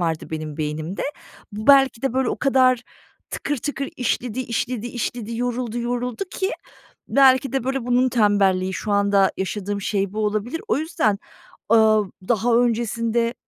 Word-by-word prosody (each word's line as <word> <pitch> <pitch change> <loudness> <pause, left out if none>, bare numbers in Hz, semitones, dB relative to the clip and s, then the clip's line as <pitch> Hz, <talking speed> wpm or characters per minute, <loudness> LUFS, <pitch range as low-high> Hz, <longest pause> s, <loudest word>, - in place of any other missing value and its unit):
vardı 165 -2 -2
benim 155 -2 -5
beynimde. 155 +4 -3 0.5
Bu 215 +2 -6
belki 270 -4 +5
de 270 - 0
böyle 260 -1 +1
o - - -2
kadar 255 -3 +3 0.5
tıkır 290 0 -2
tıkır 275 +1 -4
işledi, 250 0 -1
işledi, 240 -1 -3
işledi, 235 -1 -4
yoruldu, 240 -1 -2
yoruldu 245 - -2
ki 380 +1 -2 0.6
belki 265 +1 +4
de 270 -3 -1
böyle 265 -2 -2
bunun 250 +1 +3
tembelliği, 200 -5 +2
şu 210 - -4
anda 200 -1 +3
yaşadığım 200 +2 -3
şey 200 -1 -1
bu 215 - -5
olabilir. 215 +9 -2
O - - +2
yüzden, 260 - 0 0.5
ııı, 215 -3 +4 0.2
daha 235 0 +2
öncesinde 235 0 +1
230 Hz, 145 wpm, -22 LUFS, 205-255 Hz, 0.6 s, belki